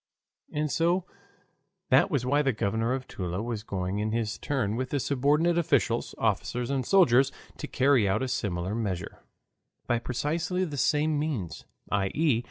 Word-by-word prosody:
And 150 Hz, 0 st, -1 dB
so 170 Hz, +2 st, +1 dB, 0.9 s
that -, -, +5 dB
was 140 Hz, -8 st, 0 dB
why 145 Hz, +3 st, +3 dB
the 135 Hz, -3 st, +1 dB
Governor 110 Hz, +3 st, -1 dB
of 130 Hz, -1 st, -6 dB
Toula 90 Hz, +2 st, -4 dB
was 115 Hz, -3 st, -3 dB
going 95 Hz, -1 st, -3 dB
in 110 Hz, +1 st, -1 dB
his 115 Hz, -2 st, -2 dB
turn 120 Hz, -7 st, -1 dB
with 130 Hz, +2 st, -2 dB
his 140 Hz, -3 st, -1 dB
subordinate 150 Hz, +5 st, +2 dB
officials, 135 Hz, -7 st, +1 dB
officers, 120 Hz, +3 st, -1 dB
and 135 Hz, -2 st, 0 dB
soldiers 135 Hz, -5 st, +4 dB, 0.3 s
to -, -, -5 dB
carry 130 Hz, -6 st, +3 dB
out 105 Hz, +6 st, +1 dB
a -, -, -1 dB
similar 95 Hz, -7 st, -2 dB
measure. 100 Hz, -7 st, -3 dB, 0.7 s
By 120 Hz, -1 st, +1 dB
precisely 160 Hz, +10 st, -1 dB
the 150 Hz, -4 st, -6 dB
same 150 Hz, +2 st, +2 dB
means, 135 Hz, -, -3 dB, 0.3 s
i. 100 Hz, -1 st, +2 dB
e. 150 Hz, -7 st, +3 dB
125 Hz, 165 wpm, -28 LUFS, 110-150 Hz, 0.9 s, that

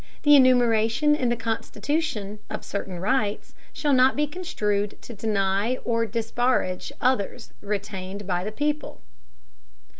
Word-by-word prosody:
The 295 Hz, -1 st, +7 dB
enumeration 245 Hz, +1 st, +4 dB
in 255 Hz, -5 st, 0 dB
the 240 Hz, -, +1 dB
Constitution, 225 Hz, -1 st, -2 dB
of -, -, -5 dB
certain 190 Hz, -3 st, -4 dB
rights, 210 Hz, +1 st, -1 dB, 0.2 s
shall 290 Hz, -2 st, 0 dB
not 260 Hz, +1 st, +5 dB
be 295 Hz, -, +2 dB
construed 210 Hz, -, -2 dB
to 240 Hz, -, -8 dB
deny 205 Hz, +2 st, 0 dB
or 230 Hz, -1 st, +1 dB
disparage 230 Hz, -3 st, -1 dB
others 250 Hz, -6 st, -1 dB
retained 200 Hz, -1 st, -4 dB
by 180 Hz, -1 st, -1 dB
the 210 Hz, -, -4 dB
people. 295 Hz, -, -2 dB
225 Hz, 125 wpm, -25 LUFS, 205-260 Hz, 0.2 s, The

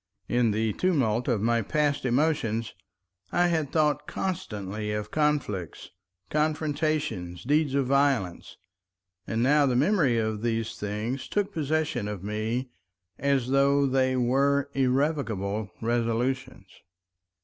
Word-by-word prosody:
In 120 Hz, -1 st, +2 dB
the 110 Hz, 0 st, 0 dB
tumult 125 Hz, -10 st, +1 dB
of 120 Hz, -6 st, +1 dB
my 115 Hz, 0 st, +2 dB
passed 145 Hz, +5 st, 0 dB
emotions 120 Hz, -5 st, 0 dB, 0.6 s
I 175 Hz, 0 st, +3 dB
had 160 Hz, -5 st, 0 dB
thought 150 Hz, -2 st, +1 dB
constantly 105 Hz, -, -4 dB
of 105 Hz, 0 st, -4 dB
conflicts, 145 Hz, -, -1 dB, 0.4 s
confrontations, 150 Hz, -, -1 dB
deeds 145 Hz, +1 st, +1 dB
of 140 Hz, -1 st, +2 dB
violence, 135 Hz, -9 st, 0 dB, 0.7 s
and 115 Hz, +1 st, 0 dB
now 145 Hz, +2 st, +4 dB
the 125 Hz, -, +1 dB
memory 145 Hz, -, +3 dB
of 110 Hz, -1 st, -1 dB
these 115 Hz, -1 st, -1 dB
things 105 Hz, +6 st, -3 dB
took 205 Hz, -1 st, -1 dB
possession 155 Hz, -7 st, -1 dB
of 105 Hz, -3 st, -5 dB
me 110 Hz, +5 st, -2 dB, 0.5 s
as 140 Hz, -3 st, +1 dB
though 140 Hz, +1 st, +3 dB
they 130 Hz, -1 st, +2 dB
were 140 Hz, +3 st, +2 dB
irrevocable 125 Hz, -7 st, 0 dB
resolutions. 120 Hz, +3 st, -1 dB
130 Hz, 115 wpm, -27 LUFS, 110-145 Hz, 0.7 s, now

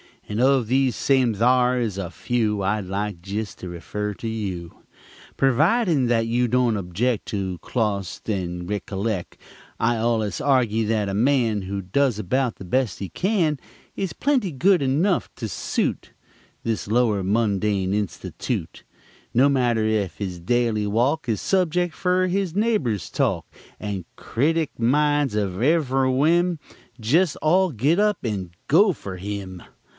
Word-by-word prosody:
And 105 Hz, +1 st, -3 dB
of 130 Hz, -2 st, +3 dB
these 130 Hz, +1 st, +2 dB
same 130 Hz, -4 st, +2 dB
thare 125 Hz, +3 st, +3 dB
is 110 Hz, -5 st, -2 dB
a 95 Hz, -3 st, -3 dB
few 105 Hz, +1 st, -1 dB
I'd 100 Hz, +1 st, 0 dB
like 100 Hz, -1 st, -3 dB
to 95 Hz, -, -13 dB
jest 105 Hz, 0 st, -4 dB
refer 100 Hz, +4 st, -4 dB
to 115 Hz, -, -6 dB
you 95 Hz, -7 st, -4 dB, 0.6 s
Pervidin' 155 Hz, -, +3 dB
that 115 Hz, -1 st, +2 dB
you 120 Hz, +2 st, +1 dB
don't 120 Hz, -2 st, +2 dB
object 100 Hz, +6 st, -1 dB
To 105 Hz, -, -3 dB
listen 95 Hz, -2 st, -3 dB
clos't 105 Hz, -5 st, -2 dB
and 90 Hz, -3 st, -3 dB
rickollect. 100 Hz, -1 st, -3 dB, 0.4 s
I 115 Hz, +1 st, +2 dB
allus 110 Hz, -2 st, 0 dB
argy 120 Hz, -6 st, +2 dB
that 105 Hz, -2 st, 0 dB
a -, -, -3 dB
man 115 Hz, -2 st, +2 dB
Who 100 Hz, +1 st, -4 dB
does 120 Hz, +5 st, +1 dB
about 120 Hz, +5 st, 0 dB
the 95 Hz, -, -10 dB
best 120 Hz, +2 st, 0 dB
he 95 Hz, -, -5 dB
can 175 Hz, -7 st, 0 dB, 0.4 s
Is 190 Hz, -5 st, -3 dB
plenty 255 Hz, -, +1 dB
good 180 Hz, +6 st, +3 dB
enugh 155 Hz, +8 st, +1 dB
to 115 Hz, -3 st, -5 dB
suit 85 Hz, -, -2 dB, 0.5 s
This 115 Hz, -3 st, -2 dB
lower 110 Hz, -3 st, +2 dB
mundane 100 Hz, -2 st, +1 dB
institute 105 Hz, -3 st, -4 dB, 0.5 s
No 135 Hz, +4 st, +5 dB
matter 120 Hz, -5 st, +2 dB
ef 105 Hz, -6 st, 0 dB
his 95 Hz, -4 st, -4 dB
daily 110 Hz, +2 st, +1 dB
walk 125 Hz, +9 st, +1 dB
Is 110 Hz, -, 0 dB
subject 175 Hz, -2 st, +1 dB
fer 185 Hz, 0 st, +1 dB
his 185 Hz, -2 st, -1 dB
neghbor's 175 Hz, -, 0 dB
talk, -, -, 0 dB, 0.4 s
And 100 Hz, -4 st, -4 dB
critic 155 Hz, +4 st, -1 dB
minds 145 Hz, +1 st, +2 dB
of 100 Hz, -2 st, -1 dB
ev'ry 135 Hz, -3 st, +2 dB
whim 170 Hz, +6 st, +2 dB, 0.4 s
Jest 155 Hz, +9 st, +2 dB
all 180 Hz, +3 st, +3 dB
git 145 Hz, -, +1 dB
up 210 Hz, -2 st, +1 dB
and 100 Hz, -7 st, -3 dB, 0.2 s
go 190 Hz, +6 st, +5 dB
fer 95 Hz, -, -8 dB
him! 95 Hz, -2 st, -6 dB
115 Hz, 150 wpm, -23 LUFS, 100-140 Hz, 0.6 s, No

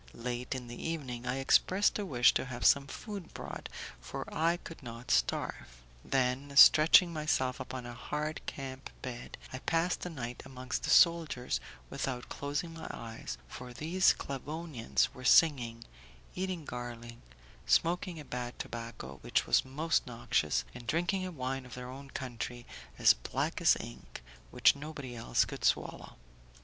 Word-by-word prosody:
Late 125 Hz, +2 st, -3 dB
in 125 Hz, -1 st, -5 dB
the 120 Hz, 0 st, -8 dB
evening 130 Hz, -7 st, -4 dB
I 125 Hz, -, 0 dB
expressed 185 Hz, +10 st, +3 dB
a 205 Hz, -, -2 dB
wish 120 Hz, -5 st, +5 dB
to -, -, 0 dB
have 125 Hz, -1 st, -5 dB
some 140 Hz, -1 st, +5 dB
food 200 Hz, +4 st, -7 dB
bought, -, -, -6 dB, 0.3 s
for 60 Hz, -, -6 dB
I 165 Hz, +2 st, +2 dB
could 165 Hz, -2 st, -11 dB
not 120 Hz, -1 st, -7 dB
starve; -, -, 0 dB, 0.2 s
then, 135 Hz, +2 st, 0 dB
stretching 165 Hz, +5 st, +8 dB
myself 150 Hz, -5 st, 0 dB
upon 130 Hz, -2 st, -6 dB
a 120 Hz, -, -6 dB
hard 150 Hz, +5 st, -4 dB
camp 135 Hz, -1 st, -6 dB
bed, 125 Hz, -1 st, -6 dB, 0.2 s
I 130 Hz, -, -4 dB
passed 165 Hz, +5 st, 0 dB
the 180 Hz, -, -4 dB
night 125 Hz, -7 st, -6 dB
amongst 130 Hz, -1 st, -4 dB
the -, -, -3 dB
soldiers 165 Hz, -7 st, +4 dB, 0.3 s
without 125 Hz, -2 st, -3 dB
closing 145 Hz, +4 st, -3 dB
my 160 Hz, -1 st, -7 dB
eyes, 110 Hz, -, -6 dB
for 125 Hz, -, -9 dB
these 170 Hz, +8 st, -1 dB
Sclavonians 135 Hz, -, -2 dB
were 130 Hz, -, -11 dB
singing, 125 Hz, -6 st, +4 dB, 0.5 s
eating 185 Hz, -4 st, -3 dB
garlic, 120 Hz, -2 st, -6 dB, 0.5 s
smoking 175 Hz, 0 st, +2 dB
a 150 Hz, -, -9 dB
bad 125 Hz, -1 st, -5 dB
tobacco 115 Hz, -, -7 dB
which -, -, +1 dB
was -, -, +4 dB
most 150 Hz, +4 st, 0 dB
noxious, 115 Hz, -, 0 dB
and 120 Hz, -1 st, -10 dB
drinking 180 Hz, +4 st, 0 dB
a -, -, -6 dB
wine 135 Hz, -3 st, -3 dB
of 125 Hz, -, -10 dB
their 125 Hz, 0 st, -7 dB
own 135 Hz, +1 st, -10 dB
country, 120 Hz, -2 st, -5 dB, 0.3 s
as -, -, +7 dB
black -, -, -3 dB
as -, -, +6 dB
ink, -, -, -9 dB, 0.3 s
which -, -, +5 dB
nobody 140 Hz, -4 st, -7 dB
else 115 Hz, -, +2 dB
could -, -, -8 dB
swallow. -, -, 0 dB
130 Hz, 155 wpm, -32 LUFS, 120-155 Hz, 0.5 s, stretching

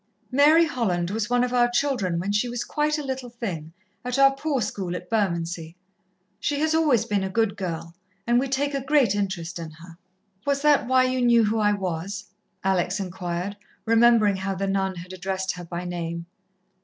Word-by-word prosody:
"Mary 300 Hz, +5 st, +6 dB
Holland 185 Hz, -, -1 dB
was 215 Hz, +1 st, -2 dB
one 245 Hz, 0 st, +3 dB
of 250 Hz, 0 st, -1 dB
our 240 Hz, -1 st, +4 dB
children 240 Hz, -9 st, 0 dB
when 185 Hz, +4 st, -2 dB
she 210 Hz, +4 st, +1 dB
was 240 Hz, 0 st, -3 dB
quite 300 Hz, +1 st, 0 dB
a 300 Hz, -, -4 dB
little 265 Hz, -2 st, -4 dB
thing, 190 Hz, -10 st, -5 dB, 0.3 s
at 250 Hz, +1 st, -2 dB
our 275 Hz, 0 st, +7 dB
Poor 280 Hz, 0 st, -1 dB
school 185 Hz, -5 st, -3 dB
at 180 Hz, -, -8 dB
Bermondsey. 170 Hz, -5 st, -1 dB, 0.6 s
She 290 Hz, -1 st, -1 dB
has 315 Hz, +1 st, +1 dB
always 305 Hz, -8 st, +3 dB
been 205 Hz, -2 st, 0 dB
a 190 Hz, -, -2 dB
good 215 Hz, 0 st, +1 dB
girl, 170 Hz, -4 st, -5 dB, 0.3 s
and 240 Hz, +1 st, +3 dB
we 270 Hz, -, 0 dB
take 280 Hz, +2 st, 0 dB
a 275 Hz, -, -1 dB
great 270 Hz, -7 st, +3 dB
interest 190 Hz, -4 st, -3 dB
in 165 Hz, -1 st, -6 dB
her." 165 Hz, +2 st, -14 dB, 0.4 s
"Was 280 Hz, 0 st, 0 dB
that 295 Hz, -5 st, +4 dB
why 260 Hz, 0 st, +4 dB
you 255 Hz, 0 st, 0 dB
knew 235 Hz, -1 st, +5 dB
who 220 Hz, +1 st, +1 dB
I 210 Hz, -1 st, +3 dB
was?" 190 Hz, +1 st, -4 dB, 0.3 s
Alex 190 Hz, +1 st, +1 dB
inquired, 180 Hz, +1 st, -4 dB, 0.3 s
remembering 225 Hz, -3 st, +4 dB
how 195 Hz, +1 st, -3 dB
the 195 Hz, -, -2 dB
nun 195 Hz, -1 st, 0 dB
had 180 Hz, +2 st, -9 dB
addressed 190 Hz, +1 st, -2 dB
her 180 Hz, -, -8 dB
by 175 Hz, +1 st, -5 dB
name. 170 Hz, -1 st, -4 dB
205 Hz, 195 wpm, -25 LUFS, 180-255 Hz, 0.6 s, our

